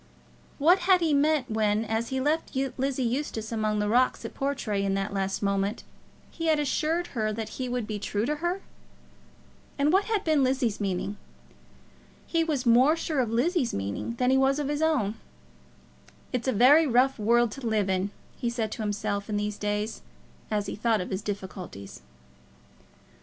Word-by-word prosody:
What 340 +6 +5
had 370 -1 +7
he 320 -3 +2
meant 285 -3 +2
when, 215 0 +1
as 225 +1 -2
he 265 - -1
left 300 +3 -1 0.2
Lizzie 265 0 -1
Eustace 235 -3 -2
among 215 -1 0
the 210 0 0
rocks 250 +4 +2
at - - -6
Portray, 250 -8 -2
in 195 0 0
that 195 +1 -2
last 195 0 -2
moment, 200 +2 0 0.5
he 330 -1 -4
had 310 -1 +3
assured 310 +4 0
her 215 -3 0
that 220 0 -4
he 255 +2 -4
would 245 -2 -2
be 210 -1 -4
true 205 +1 -1
to 300 +3 -1
her? 345 +4 -2 1.2
And 290 +3 +2
what 390 +2 +4
had 435 -3 0
been 310 -4 +3
Lizzie's 255 -5 0
meaning? 200 +1 -2 1.1
He 330 -1 +1
was 295 -5 -1
more 250 +6 +5
sure 320 -3 -2
of 245 -3 +1
Lizzie's 255 - +1
meaning 100 - -3
than 250 +1 +2
he 265 - +4
was 270 +1 +3
of 290 -1 -2
his 295 +1 -1
own. 260 -10 +1 1.2
"It's 250 0 -2
a - - +3
very 280 +8 +6
rough 255 +1 +3
world 235 +2 +3
to 250 +1 -5
live 215 -3 +1
in," 190 +1 0 0.3
he 240 - 0
said 230 -3 -2
to - - -5
himself 205 -1 -2
in 210 - -1
these 210 0 -3
days 210 +1 -2 0.5
as 210 -2 0
he - - -4
thought 220 0 +1
of 180 - -6
his 190 +1 -2
difficulties. 185 - -7
235 Hz, 180 wpm, -27 LUFS, 210-285 Hz, 1.2 s, had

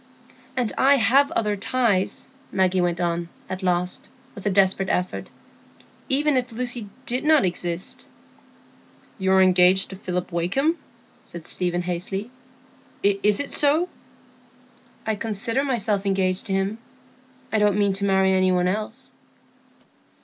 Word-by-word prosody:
"And 240 -4 0
I 275 +2 +6
have 270 +4 +4
other 210 -2 0
ties," 205 -2 0 0.2
Maggie 185 -1 +2
went 175 -1 0
on, 170 -1 -1 0.2
at 185 +1 -5
last, 180 -1 -1 0.2
with 200 +1 -6
a - - +4
desperate 190 -1 +2
effort, 180 0 -2 0.8
"even 290 +1 +2
if 250 -1 -2
Lucy 240 -2 -3 0.2
did 255 +1 -2
not 310 -6 +4
exist." 175 0 -4 1.1
"You 190 0 +1
are 190 0 +6
engaged 185 +1 +4
to - - -6
Philip 180 -1 -4
Wakem?" 200 - +1 0.5
said 170 -2 -9
Stephen, 175 -1 -1
hastily. 185 +5 -4 0.7
"Is 200 +1 +2
it 285 - -3
so?" 305 +5 +2 1.2
"I 220 - 0
consider 225 +4 -1
myself 220 -7 0
engaged 190 -1 0
to 195 - -2
him; 195 +3 -1 0.7
I 220 - +3
don't 210 -1 +3
mean 200 -1 +2
to 195 +1 -4
marry 190 -1 +3
any 185 0 +3
one 180 0 +2
else." 215 +6 -4
195 Hz, 135 wpm, -23 LUFS, 185-235 Hz, 1.2 s, I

